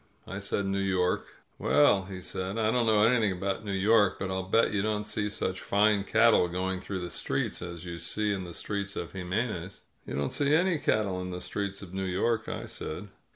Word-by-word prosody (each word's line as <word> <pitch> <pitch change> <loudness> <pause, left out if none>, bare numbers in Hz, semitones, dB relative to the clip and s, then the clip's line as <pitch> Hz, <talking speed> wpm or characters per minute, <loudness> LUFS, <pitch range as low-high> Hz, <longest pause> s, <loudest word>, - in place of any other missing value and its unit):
I 95 - -5
said 100 0 -2
New 95 0 0
York. 95 -2 +1 0.3
"Well," 95 +7 +4
he 95 -1 -7
said, 95 +3 -4
"I 110 -1 +2
don't 120 -1 +2
know 105 -1 +5
anything 115 -3 +4
about 95 +3 -2
New 100 - -4
York, 100 +1 +4
but 95 -1 -3
I'll 95 0 -3
bet 115 +1 +3
you 100 - +1
don't 105 0 0
see 105 0 -2
such 95 -2 -3
fine 105 0 +3
cattle 110 -3 +5
going 95 +1 -2
through 95 -1 -4
the 90 - -5
streets - - -2
as 85 -1 -6
you 85 -1 -6
see 105 +2 -1
in 95 -2 -3
the 85 -1 -8
streets 100 -1 -3
of - - -5
Jim 90 -2 -6
mez. 100 -3 -2 0.3
"You - - -4
don't 70 -1 -1
see 145 +1 +2
any 175 -1 +2
cattle 100 -8 +1
in 90 - -5
the 90 0 -4
streets 100 +2 -3
of 90 -2 -11
New 95 0 -2
York," 110 +5 0
I - - -4
said. 90 +6 -6
100 Hz, 220 wpm, -29 LUFS, 95-105 Hz, 0.3 s, know